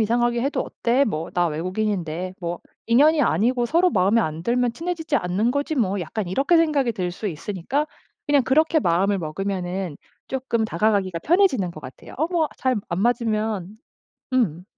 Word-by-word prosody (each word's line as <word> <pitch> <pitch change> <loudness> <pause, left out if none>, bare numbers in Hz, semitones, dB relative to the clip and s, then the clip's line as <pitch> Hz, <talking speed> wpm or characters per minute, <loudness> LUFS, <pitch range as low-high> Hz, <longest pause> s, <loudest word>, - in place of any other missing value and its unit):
이상하게 235 +2 +1
해도 275 +3 -1
어때 245 +4 0
뭐 165 - -3
나 175 -1 +2
외국인인데 185 +1 -2
뭐 175 -1 -4 0.3
인연이 295 +7 +5
아니고 240 - +2
서로 345 +7 +3
마음에 195 +5 +3
안 160 -2 -3
들면 245 0 +1
친해지지 320 +2 -2
않는 200 +2 0
거지 285 +4 -1
뭐.' 205 -7 0
약간 180 +3 -4
이렇게 275 - +2
생각이 290 -7 +2
들 180 -3 -2
수 200 +4 -6
있으니까 200 - -2 0.4
그냥 290 -3 +3
그렇게 315 +4 +3
마음을 195 - +2
먹으면은 180 0 -3 0.3
쪼끔 250 -4 -1
다가가기가 195 -3 0
편해지는 285 - +2
것 155 - -10
같아요. 130 -2 -11
'어 315 - +1
뭐 335 -4 +1
잘 260 -1 0
안 170 +2 -2
맞으면' 220 -4 -1 0.6
음. 180 -9 +1
220 Hz, 355 characters per minute, -23 LUFS, 180-265 Hz, 0.6 s, 인연이